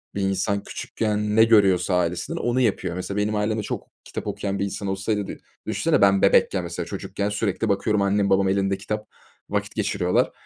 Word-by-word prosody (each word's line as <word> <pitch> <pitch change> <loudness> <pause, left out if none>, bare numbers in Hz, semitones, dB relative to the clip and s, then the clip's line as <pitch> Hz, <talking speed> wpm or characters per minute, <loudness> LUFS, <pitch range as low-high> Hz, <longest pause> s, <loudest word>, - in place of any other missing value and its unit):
bir 100 - -1
insan 95 +1 0
küçükken 105 -1 -2
ne 110 - +7
görüyorsa 100 -5 +4
ailesinden 90 0 -1
onu 120 +1 0
yapıyor. 105 -7 0
Mesela, 90 +2 -4
benim 105 +1 0
ailemde 105 +1 0
çok - - -5 0.2
kitap - - -6
okuyan 100 -1 -3
bir 100 - +1
insan 100 0 -4
olsaydı 100 +1 -1
dü - - -6 0.3
düşünsene - - +1
ben 100 -1 +5
bebekken, 95 -1 +4
mesela, 85 0 -4
çocukken 100 +1 -3
sürekli 105 +1 -1
bakıyorum, 100 +1 +1
annem 100 0 +2
babam 95 0 +3
elinde 95 0 +1
kitap 105 +2 -4 0.4
vakit 105 +1 -2
geçiriyorlar. 100 -4 +1
100 Hz, 180 wpm, -24 LUFS, 95-105 Hz, 0.4 s, ne